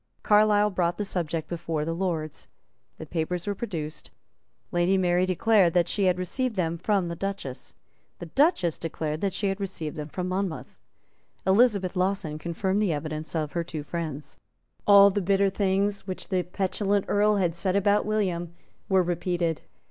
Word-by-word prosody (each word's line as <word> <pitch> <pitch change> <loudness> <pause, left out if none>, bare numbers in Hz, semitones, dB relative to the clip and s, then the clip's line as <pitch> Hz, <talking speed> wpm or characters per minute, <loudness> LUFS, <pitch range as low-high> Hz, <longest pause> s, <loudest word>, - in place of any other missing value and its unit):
Carlisle 210 0 +4
brought 175 -2 0
the 210 - -2
subject 165 -4 -2
before 165 -3 -3
the 165 - -2
Lords. 165 -4 -3 0.5
The - - -8
papers 175 +1 -3
were 205 - -1
produced. 165 -8 -5 0.6
Lady 175 +2 +2
Mary 180 0 +2
declared 185 -1 +3
that 175 -1 +3
she 200 +1 0
had 180 -1 +3
received 225 +7 -2
them 170 -3 -1
from 195 -1 +1
the 170 - -4
Duchess. 195 -8 -5 0.4
The - - -7
Duchess 220 - +2
declared 155 -1 -3
that 200 - 0
she 200 0 0
had 195 +1 -3
received 170 -5 -4
them 150 0 -5
from 180 +3 -4
Monmouth. 185 -2 -3 0.7
Elizabeth 200 -2 +3
Lawson 180 -5 -1
confirmed 190 +5 -1
the 200 -5 +2
evidence 155 +1 -4
of 155 -2 -1
her 170 - -1
two 155 -3 -6
friends. 155 -3 -5 0.5
All 200 0 +8
the 205 +1 -1
bitter 195 +1 +2
things 200 +1 0
which 185 - -5
the 185 -2 +1
petulant 195 +2 -1
Earl 210 +1 +3
had 180 -4 +1
said 185 +2 -1
about 205 +1 +3
William 180 -6 -1 0.3
were 190 -1 +4
repeated. 175 -1 -1
185 Hz, 165 wpm, -26 LUFS, 165-200 Hz, 0.7 s, All